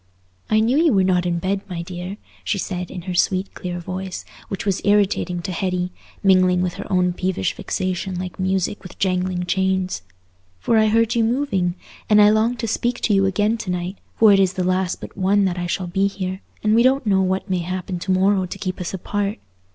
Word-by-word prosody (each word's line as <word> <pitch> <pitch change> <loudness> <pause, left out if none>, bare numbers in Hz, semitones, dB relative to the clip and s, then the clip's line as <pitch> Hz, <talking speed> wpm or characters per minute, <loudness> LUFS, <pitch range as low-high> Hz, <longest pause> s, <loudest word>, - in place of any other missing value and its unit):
"I 215 0 +4
knew 240 +5 +2
you 325 -5 +4
were 195 -2 +4
not 180 -1 +2
in 170 -1 0
bed, 195 +3 -1
my 170 -2 -4
dear," 180 +2 -6 0.3
she 205 - -1
said, 180 -2 -4
in 180 -2 -7
her 185 0 -4
sweet 185 +2 +1
clear 175 -1 -5
voice, 185 +1 -5 0.2
which 195 - -5
was 195 -2 0
irritating 200 -4 +2
to 190 - -3
Hetty, 180 0 -1 0.3
mingling 185 -2 +4
with 180 -1 -1
her - - -8
own 180 -1 +2
peevish 180 - -1
vexation 185 -1 -3
like 180 0 -6
music 190 +1 0
with 180 - -11
jangling 185 -1 0
chains, 190 0 0 0.6
"for 220 - +2
I 215 - +4
heard 225 +1 +3
you 235 -2 +2
moving; 220 -8 0 0.3
and 210 -1 +6
I 210 0 +7
longed 225 +3 +2
to 230 - -2
speak 240 +2 -1
to 215 - +2
you 195 -1 +4
again 210 +4 +1
to 195 - -5
night, 180 +2 -3 0.2
for 220 -2 +6
it 195 - +5
is 190 -1 +3
the 185 - -1
last 185 0 0
but - - -9
one 200 +1 +2
that 180 -1 -1
I 175 - -2
shall 180 +1 -2
be 195 +3 +1
here, 190 -1 -4 0.2
and 215 0 +3
we 230 - +5
don't 260 +1 +3
know 195 -2 +3
what 190 +1 0
may 185 -2 0
happen 180 +1 -4
to 190 - -2
morrow 190 0 +3
to - - -7
keep 185 -1 -4
us 180 +2 -3
apart. 205 +3 -2
190 Hz, 220 wpm, -21 LUFS, 180-205 Hz, 0.6 s, I